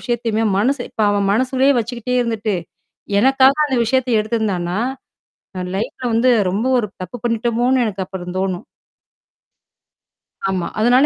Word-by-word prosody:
விஷயத்தையுமே 230 -2 -1
மனசு 255 +5 +1
இப்ப - - -6
அவன் 200 -1 +1
மனசுள்ளேயே 260 +4 +3
வச்சுக்கிட்டே 240 +2 -3
இருந்துட்டு, 220 -3 -1 0.7
எனக்காக 265 +2 +5
அந்த 265 -3 -1
விஷயத்த 260 +2 +1
எடுத்திருந்தான்னா? 210 -5 -1 0.8
அ - - -2
லைஃப்ல 235 +4 -4
வந்து 245 +3 +4 0.2
ரொம்ப 205 +5 -1
ஒரு 210 -3 -1
தப்பு 185 +6 -6
பண்ணீட்டோமோனு 240 +2 +1
எனக்கு 195 -2 -3
அப்புறம் 180 -1 -7
தோணும். 185 -2 -2 1.9
ஆமா. 185 -2 -1
அதுனால 245 +5 +5
230 Hz, 125 wpm, -19 LUFS, 200-250 Hz, 1.9 s, எனக்காக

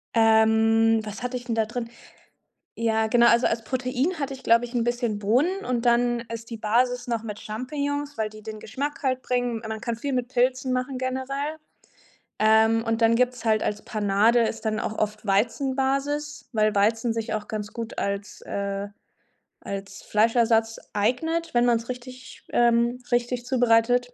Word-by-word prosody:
Ähm, 225 0 +4
was 215 +3 -7
hatte 250 0 -2
ich 245 - -10
denn 230 - -2
da 225 -1 +2
drin? 230 +1 -5 0.9
Ja, 220 -1 +1
genau, 235 +1 +5
also 235 +1 +4
als 225 0 0
Protein 255 +8 -1
hatte 280 -1 -2
ich, 265 - -10
glaube 230 +1 +4
ich, 240 - -12
'n 240 - +1
bisschen 240 -3 -1
Bohnen 275 - +1
und 245 -1 -1
dann 240 0 +3
ist 230 0 -7
die 230 - -6
Basis 245 +3 +1
noch 230 -2 -1
mit 210 -2 -6
Champignons, 285 +5 -4
weil 215 -1 -1
die 215 0 -13
den 215 0 -7
Geschmack 280 +8 -5
halt 255 -1 0
bringen. 245 -2 -1
Man 220 0 -4
kann 235 0 -3
viel 275 +4 -4
mit 250 -1 -1
Pilzen 255 0 +1
machen 255 +1 -2
generell. 265 +4 -3 0.8
Ähm, 220 +1 +4
und 225 +1 -1
dann 225 0 +5
gibt's 250 0 0
halt 220 -1 +2
als 210 0 -2
Panade 215 +2 +2
ist 225 0 -2
dann 215 -1 -1
auch 220 - -4
oft 215 0 -2
Weizenbasis, 270 +7 0
weil 215 -2 +2
Weizen 225 +3 +2
sich 225 -1 -3
auch 210 -1 -4
ganz 210 -1 -5
gut 230 -1 -6
als, 200 0 -3
äh 200 0 -3 0.7
als 195 0 -7
Fleischersatz 225 +1 +2
eignet, 320 +11 0
wenn 240 0 +3
man's 235 0 +1
richtig, 255 +1 -9
ähm 235 +1 +2
richtig 240 0 0
zubereitet. 245 -1 +2
235 Hz, 170 wpm, -25 LUFS, 220-255 Hz, 0.9 s, genau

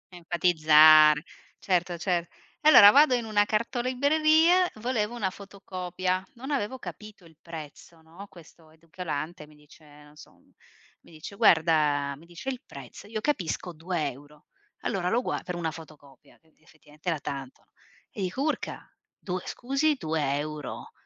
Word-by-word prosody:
Enfatizzare, 155 -3 +5 0.3
certo, 175 -2 -1
cer 175 -1 -1 0.4
allora, 205 -9 +9
vado 285 0 +5
in 240 -2 0
una 210 -2 +2
cartolibreria, 310 - +2
volevo 225 0 -2
una 205 -5 -1
fotocopia, 185 -2 -5
non 265 +4 -9
avevo 260 -2 -2
capito 210 -6 -11
il 160 -1 -19
prezzo, 160 0 -11
no? 165 +5 -13
Questo 165 -2 -18
edicolante 160 -1 -7
mi 150 - -19
dice, 150 +1 -20 0.2
non 150 0 -19
so, - - -15 0.7
mi - - -20
dice: 160 +5 -10
"Guarda" 155 -8 +3
mi 155 - -17
dice 175 +8 -12
il 255 -1 -5
prezzo, 140 +8 -12
io 220 0 -4
capisco 180 - -2
2€. 150 -4 -5 0.4
Allora 185 -5 -1
lo 240 +4 +1
guar - - -4
per 180 - -5
una 165 -2 -3
fotocopia, 150 -4 -15
che 160 -1 -32
effettivamente 155 +1 -10
era 160 - -1
tanto, 135 -2 -7
no? - - -45 0.4
E 200 - -7
dico 185 +8 -3
"Urca, 310 - -3 0.3
2 185 -1 -4
scusi, 275 +4 0
2€?" 150 - -4
175 Hz, 140 wpm, -27 LUFS, 155-215 Hz, 0.7 s, allora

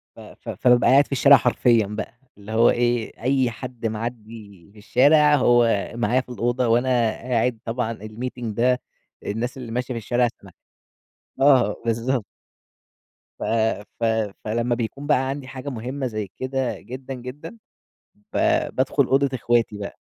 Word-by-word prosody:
ف - - -14
ف - - -12
فبابقى 125 -1 +3
قاعد 140 +2 +6
في - - -24
الشارع 140 +1 +7
حرفيًا 115 -2 +2
بقى، 110 +3 -6 0.2
اللي 105 +1 -11
هو 115 +1 +5
إيه 120 -2 -1
أي 130 -2 +2
حد 120 0 -8
معِّدي 110 -4 -7
في - - -20
الشارع، 145 +7 +4
هو 120 -5 +3
معايا 120 +2 +1
في - - -20
الأوضة 120 0 -1
وأنا 120 -1 +2
قاعد 120 0 -1
طبعًا 115 0 -2
الmeeting 120 +3 -6
ده 125 +3 +1 0.4
الناس 115 +5 -3
اللي 125 -3 -7
ماشية 125 +2 -2
في - - -4
الشارع 120 +2 +1
سمع - - -14 0.9
آه 135 -3 +4
بالضبط. 115 +1 0 1.1
ف - - -5 0.6
ف - - -4 0.4
فلمّا 120 +2 0
بيكون 125 +5 -5
بقى 135 -3 +2
عندي 135 -1 -5
حاجة 130 +1 -7
مهمة 130 +3 -4
زي 110 -3 -4
كده 130 -1 -2
جدًا، 130 +2 -8
جدًا 130 - -9 0.8
ب - - -4 0.4
بادخل 135 +1 +2
أوضة 140 +2 +2
اخواتي 115 -3 0
بقى، 100 - -7
120 Hz, 150 wpm, -23 LUFS, 115-130 Hz, 1.1 s, الشارع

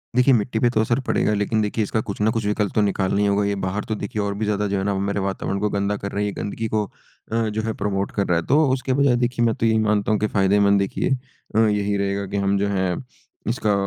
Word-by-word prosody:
देखिए, 125 +2 +5
मिट्टी 110 0 +1
पे 120 - +3
तो 110 -2 +1
असर 120 +3 +1
पड़ेगा। 105 - +2
लेकिन 105 +1 0
देखिए 105 +1 0
इसका 110 +2 -1
कुछ 100 0 -6
न 110 +1 +3
कुछ 115 -2 -2
विकल्प 105 -1 0
तो 105 - +4
निकालना 100 -1 +1
ही 105 - +3
होगा 100 +1 +2
ये 100 - 0
बाहर 100 +3 -2
तो 110 - 0
देखिए 105 +1 -3
और 100 0 -1
भी 110 +1 -2
ज़्यादा 105 0 0
जो 100 0 -1
है 95 - -1
ना 100 0 0
मेरे 100 +1 -1
वातावरण 95 0 -2
को 105 - 0
गंदा 100 0 -1
कर 100 0 -5
रहे 100 +1 -1
हैं। - - 0
ये - - -6
गंदगी 110 +2 -3
को 110 0 0
अ, 110 - -12
जो 110 +1 -2
है 110 0 -2
प्रमोट 100 -1 -1
कर 100 - 0
रहा 90 - +2
है। 85 - -2
तो 150 +3 +4
उसके 130 0 -1
बजाए 140 -2 +3
देखिए 120 -1 +1
मैं 115 - +2
तो 115 - -1
यही 110 0 +3
मानता 105 -1 +1
हूँ 105 - +2
कि 105 - +1
फायदेमंद 100 0 +3
देखिए 100 - -1 0.5
अ, 110 - +4
यही 105 -2 +2
रहेगा 100 0 -1
की 100 - -1
हम 100 0 +1
जो 100 +1 +1
हैं 95 -3 0 0.5
इसका 110 -3 +1
105 Hz, 275 wpm, -22 LUFS, 100-110 Hz, 0.5 s, देखिए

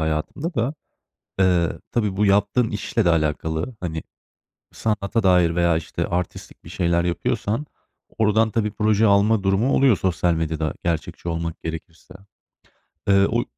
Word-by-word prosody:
hayatımda 80 - -2
da. 125 +3 -1 0.7
Iıı, 90 -3 +2
tabii, 105 -5 -1
bu 105 - +3
yaptığın 105 +4 +2
işle 105 +1 -1
de 85 - +4
alakalı, 80 +6 -1
hani, 80 -3 -4 0.7
sanata 110 0 -1
dair 90 -3 +4
veya, 85 -2 +3
işte, 80 - -3
artistlik 90 0 -5
bir - - -12
şeyler 85 -1 +1
yapıyorsan 105 - -1 0.5
oradan 110 +1 +3
tabii 105 -1 0
proje 110 +1 +2
alma 100 +1 +3
durumu 100 +7 +2
oluyor 130 -7 +4
sosyal 90 -1 +1
medyada. 80 -1 -2
Gerçekçi 85 +1 -3
olmak 85 0 -4
gerekirse, 80 +2 -8 1.0
ııı, 100 0 +5
o 115 - 0
y - - -2
95 Hz, 140 wpm, -22 LUFS, 85-110 Hz, 1.0 s, ııı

